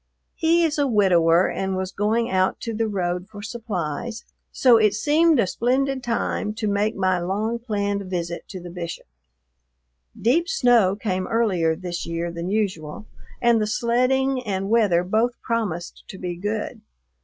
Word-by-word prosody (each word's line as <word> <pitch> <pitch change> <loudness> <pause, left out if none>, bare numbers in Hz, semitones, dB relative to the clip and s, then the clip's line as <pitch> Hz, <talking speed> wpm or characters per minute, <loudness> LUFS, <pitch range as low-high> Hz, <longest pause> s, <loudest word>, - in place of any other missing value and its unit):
He 335 +1 +2
is 310 -2 0
a 285 - +3
widower 180 -6 +4
and 190 -1 -2
was 185 0 -3
going 220 +4 0
out 185 -2 +1
to 230 - -4
the 225 +1 0
road 180 -2 -2
for 205 -1 -10
supplies, 220 -1 -4 0.3
so 245 -3 +5
it 215 -2 +3
seemed 305 +5 +3
a 225 - +4
splendid 260 +6 0
time 230 -3 -2
to 220 -1 -2
make 205 +2 0
my 185 -2 +1
long 210 +6 -2
planned 205 -3 -2
visit 170 -2 -4
to 185 - -7
the 175 0 -9
Bishop. 170 -1 -6 1.1
Deep 325 - +2
snow 245 - +4
came 190 -3 -2
earlier 185 -8 +1
this 175 0 -5
year 170 +1 -3
than 170 +1 -5
usual, 195 -4 -2 0.4
and 235 -2 +4
the 210 - 0
sledding 255 +4 +1
and 195 -2 -3
weather 205 -7 +3
both 220 +6 0
promised 205 -8 -3
to 190 - -9
be 180 -1 -4
good. 205 +4 -4
210 Hz, 160 wpm, -23 LUFS, 185-235 Hz, 1.1 s, so